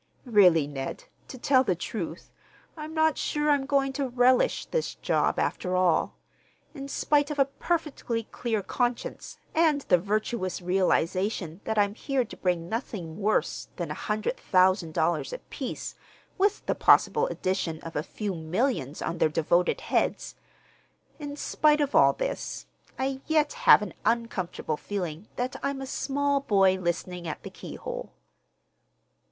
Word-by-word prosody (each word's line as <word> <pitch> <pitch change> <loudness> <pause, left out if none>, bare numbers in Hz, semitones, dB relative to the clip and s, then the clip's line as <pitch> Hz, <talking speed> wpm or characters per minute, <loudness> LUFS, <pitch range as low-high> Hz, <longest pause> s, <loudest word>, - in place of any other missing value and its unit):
Really, 185 - +5
Ned, 135 -2 -5 0.2
to 260 - -9
tell 260 +1 +4
the 185 -8 +1
truth, 170 -1 -6 0.4
I'm 310 -1 -7
not 315 -1 +2
sure 295 0 +1
I'm 275 -2 +1
going 275 -1 +1
to 270 -1 -2
relish 250 +1 +3
this 485 -1 -2
job, - - +1
after 185 -1 -1
all. 180 -3 +2 0.6
In 275 -2 -7
spite 290 +1 +1
of 300 - -4
a 275 - +5
perfectly 275 -6 -2
clear 220 -2 -3
conscience, 245 +2 -2 0.2
and 315 -3 +3
the 180 - +3
virtuous 205 0 -2
realization 185 0 0
that 220 - -2
I'm 205 -1 +3
here 260 +2 -1
to - - -10
bring 175 -2 -1
nothing 195 -7 -5
worse 215 +1 0
than - - -4
a - - -1
hundred 215 - -2
thousand 185 - +2
dollars 165 - 0
apiece - - -6 0.4
with 405 +2 +1
the - - +1
possible 460 +1 +4
addition 185 - -2
of 165 - -9
a 150 - +1
few 200 +4 -4
millions 165 - -1
on 165 +1 -3
their - - +4
devoted 170 +3 +1
heads—in 290 -2 -5
spite 300 0 +2
of 290 -1 0
all - - +6
this, - - -4 0.3
I 265 0 -2
yet 310 +1 +2 0.2
have - - +9
an - - -6
uncomfortable 195 -9 -1
feeling 180 -1 -5
that 250 +2 -2
I'm 275 0 -2
a 270 - -5
small 280 +1 0
boy 195 -7 +3
listening 175 0 -3
at 155 - -5
the - - -8
keyhole. - - -7
215 Hz, 145 wpm, -27 LUFS, 180-275 Hz, 0.6 s, have